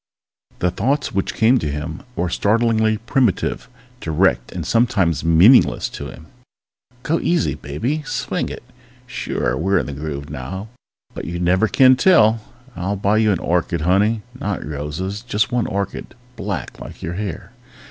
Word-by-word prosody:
The 90 - 0
thoughts 135 +10 0
which 95 -1 -2
came 120 +3 +4
to 75 - -2
him 75 +3 -5
were 90 - 0
startlingly 110 +3 +2
primitive, 115 - 0 0.3
direct 80 - +1
and - - -5
sometimes 110 - +2
meaningless 85 +10 +5
to - - -7
him. 80 - -11 0.8
_Go 165 +2 0
easy, 170 -3 +1
baby! 120 - -3
Swing 150 - -3
it! - - -8 0.4
Sure, - - -2
we're 95 +7 +1
in - - 0
the 70 - -6
groove 70 0 -6
now, 95 - -6 0.4
but - - -6
you 85 +1 -4
never 95 +5 +3
can 130 +2 +6
tell! 115 - +5 0.4
I'll 95 +3 -2
buy 100 +2 +1
you 110 -1 +3
an 95 - +1
orchid, 85 0 -1
honey! 105 +6 +2
Not 105 -6 -4
roses, 75 +7 -4
just 115 -1 -1
one 120 -2 0
orchid 100 +4 -4 0.2
black 100 -5 -5
like - - -10
your 85 - -3
hair! 95 -2 -5
100 Hz, 155 wpm, -20 LUFS, 85-115 Hz, 0.8 s, can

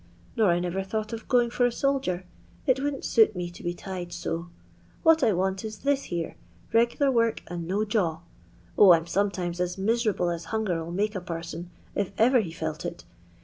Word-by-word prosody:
Nor 220 -5 +4
I 170 - +3
never 180 +2 -2
thought 215 +3 -3
of 225 - -6
gmng 240 -2 +3
for 245 - +1
a 245 - +4
soldier; 250 -10 0 0.4
it 260 -3 +4
w)uldn*t 275 0 -2
suit 220 -3 +4
me 175 -1 -3
to 175 - -12
be 175 0 -3
ti^ 180 -2 -6
so. 170 +1 -4 0.5
What 325 -1 +6
I - - +4
want 190 +1 0
is 215 -1 -5
this 280 -1 +2
here 170 -2 -4 0.2
— - - -28
re^Ur 240 +4 +3
work 230 -1 +1
and 170 -1 -5
no 200 +4 0
jaw. 180 -7 0 0.6
0, 195 -4 +9
I'm 165 -1 +2
sometimes 180 -1 -1
as 180 0 -1
miserable 210 -3 +1
as 170 0 -4
hanger 200 -7 -1
'U 165 - -7
make 210 +4 0
a 190 - -4
parson, 170 0 -6 0.2
if 200 -2 -1
ever 250 +3 +5
he 185 -7 -2
felt 160 -1 -4
it. - - -5
195 Hz, 200 wpm, -27 LUFS, 175-230 Hz, 0.6 s, 0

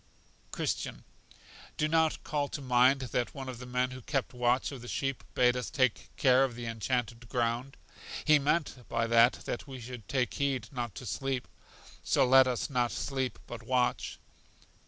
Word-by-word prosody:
Christian. - - -3 0.7
Do 150 - +2
you - - -1
not 160 0 +2
call 145 -1 -1
to 145 - -5
mind 130 +2 +4
that 125 -1 -2
one 135 -1 -6
of 125 -2 -6
the 125 - -8
men 125 +1 0
who 130 0 -8
kept 135 +1 -2
watch 125 +2 +1
of 135 -4 -8
the 120 - -9
sheep 135 +1 -2
bade 125 0 +4
us 125 - -3
take 130 -4 +1
care 130 -1 +5
of 130 -3 -1
The 120 0 -6
Enchanted 115 +1 -2
Ground? 120 +2 -1 0.5
He 155 -1 +6
meant 145 -3 0
by 115 0 +1
that 115 +1 +5
that 120 - -4
we 135 -2 -8
should 120 -3 -9
take 130 -3 0
heed 135 -5 -1
not 120 -5 -4
to 125 - -8
sleep; 135 +1 -2 0.6
so - - +3
let 130 +1 +7
us 125 -3 -1
not 125 -3 0
sleep, 130 -2 -2
but 120 -1 -8
watch. 125 +1 0
125 Hz, 180 wpm, -30 LUFS, 120-135 Hz, 0.7 s, let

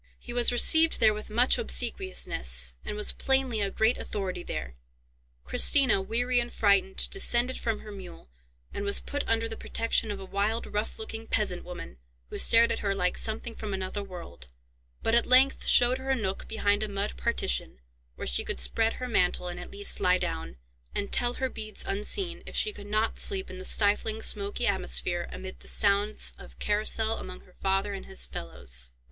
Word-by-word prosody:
He 240 - -9
was 240 0 +3
received 320 +7 +5
there 220 -1 +5
with 210 0 -8
much 245 +4 +4
obsequiousness, 65 - +1
and - - -5
was 210 - +4
plainly 265 -4 0
a 200 - 0
great 220 +4 +1
authority 185 -3 -4
there. 60 - -5 0.7
Christina, 260 - +5
weary 245 +5 0
and 240 0 -2
frightened, 200 -2 +3
descended 255 -10 +1
from 225 -2 -2
her 215 - -10
mule, 190 - -11 0.5
and 200 - -4
was 200 0 +3
put 285 0 -4
under 230 0 +1
the 225 - -6
protection 230 -1 0
of 205 -1 -4
a 190 - -8
wild, 205 +4 -1
rough 210 +2 -4
looking 225 0 -7
peasant 200 -5 0
woman, 175 - -9 0.3
who - - -4
stared 230 0 +5
at - - -2
her 200 -1 -1
like 180 -2 0
something 225 +1 -4
from 210 -3 -5
another 190 +2 -4
world, 175 - -10 0.6
but 225 - +1
at 235 - +3
length 260 +2 +4
showed 250 +1 +5
her 265 +1 -7
a 265 - +3
nook 195 -6 -3
behind 205 -2 +1
a 215 - -1
mud 200 +1 -2
partition, 65 - -1 0.4
where - - -6
she 60 -1 -1
could - - -4
spread 225 - +2
her 255 - -6
mantle, 180 -5 +1
and 175 0 -7
at 180 - -8
least 205 0 -1
lie 180 0 +3
down, 65 - -4 0.4
and 200 - -2
tell 245 0 +4
her 265 - -1
beads 215 -4 -5
unseen, 210 - -2
if - - -9
she 425 - 0
could 205 - -10
not 215 +2 -1
sleep 390 -2 -1
in 185 - -9
the - - -7
stifling, 210 +2 +1
smoky 205 +2 -1
atmosphere, 180 -3 0
amid 185 0 -8
the - - -13
sounds 205 +1 +1
of - - -14
carousal 220 +1 0
among 185 0 -9
her 180 - -22
father 195 +2 -1
and 195 - -8
his 190 - -1
fellows. 60 0 -6
210 Hz, 190 wpm, -28 LUFS, 190-235 Hz, 0.7 s, received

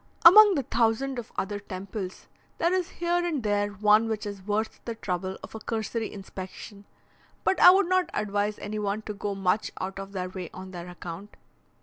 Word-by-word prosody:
Among 410 +3 +10
the 280 - 0
thousand 245 +3 +1
of 235 - -9
other 205 +1 -2
temples, 190 -1 -7 0.3
there 340 +2 +2
is 370 -2 0
here 345 +1 0
and 315 -8 -1
there 205 -1 +1
one 210 +2 +3
which 215 -1 -2
is 200 -1 -6
worth 210 +3 -2
the 230 - -4
trouble 185 -2 -3
of - - -10
a 220 - -6
cursory 225 0 -3
inspection, 195 +1 -9 0.6
but 380 - +2
I - - +10
would 380 0 +5
not 370 0 +2
advise 205 0 -1
any 210 +1 -5
one 210 +1 -2
to 210 - -5
go 200 0 -3
much 195 +2 +1
out 190 +1 -4
of 195 0 -8
their 185 -1 -3
way 185 -3 -6
on 185 0 -8
their 175 -1 -7
account. 180 +3 -9
210 Hz, 195 wpm, -27 LUFS, 195-230 Hz, 0.6 s, Among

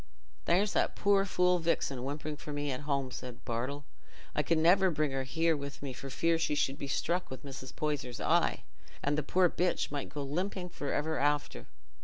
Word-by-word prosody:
"There's 195 +4 +3
that - - +1
poor 200 -1 +3
fool, 180 -1 +3
Vixen, 140 -6 0
whimpering 150 +2 -3
for 150 +1 -8
me 145 -1 -1
at 130 - -2
home," 135 -2 0
said 125 0 -8
Bartle. 130 +5 -3 0.5
"I - - +2
can 160 +2 +2
never 185 +4 +6
bring 155 -3 0
her 135 0 -2
here 165 +4 +2
with 140 -1 -6
me 135 -2 -4
for 135 +2 -7
fear 165 +4 +2
she 150 - +1
should 135 -1 0
be 140 - -4
struck 175 +6 0
with 130 +2 -8
Mrs. 130 -2 -8
Poyser's 145 -5 -2
eye, - - +2 0.4
and 145 +1 +2
the 150 - +1
poor 180 +5 +3
bitch 175 -2 0
might 145 -1 -3
go 145 0 -4
limping 180 +5 -2
for 145 -4 -4
ever 160 +2 0
after." 145 - 0
145 Hz, 200 wpm, -32 LUFS, 135-170 Hz, 0.5 s, never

